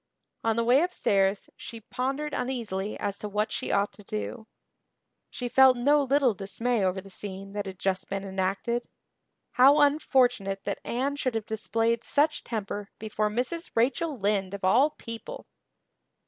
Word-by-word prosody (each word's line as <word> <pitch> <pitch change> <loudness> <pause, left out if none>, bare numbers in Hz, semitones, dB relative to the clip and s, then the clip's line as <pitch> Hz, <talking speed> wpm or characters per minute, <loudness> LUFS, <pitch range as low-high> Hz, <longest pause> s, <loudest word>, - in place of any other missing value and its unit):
On 225 -1 +2
the 230 - +1
way 250 +5 +5
upstairs 200 - +1
she 230 - -9
pondered 270 +6 -3
uneasily 215 -6 -3
as 200 0 -3
to 210 - -5
what 210 +1 -1
she - - -3
ought 200 +1 +1
to 205 - -14
do. 215 +2 -5 0.8
She 245 - -4
felt 260 +1 +6
no 285 +4 +4
little 275 -3 +3
dismay 210 +3 -1
over 190 0 0
the 195 - -14
scene 195 0 -7
that 205 -1 -3
had 190 -1 -7
just 190 0 -1
been 195 0 -3
enacted. 195 +5 -2 0.6
How 275 +4 +6
unfortunate 250 -9 +2
that 200 - -3
Anne 275 +4 -1
should 255 -4 -1
have 220 -2 -2
displayed 225 +1 0
such 300 +1 +1
temper 205 -3 -4
before 215 0 -1
Mrs. 255 +10 -2
Rachel 270 +6 +1
Lynde, 200 -2 0
of 200 - -10
all 240 +11 +5
people! 230 - -8
225 Hz, 160 wpm, -27 LUFS, 200-260 Hz, 0.8 s, felt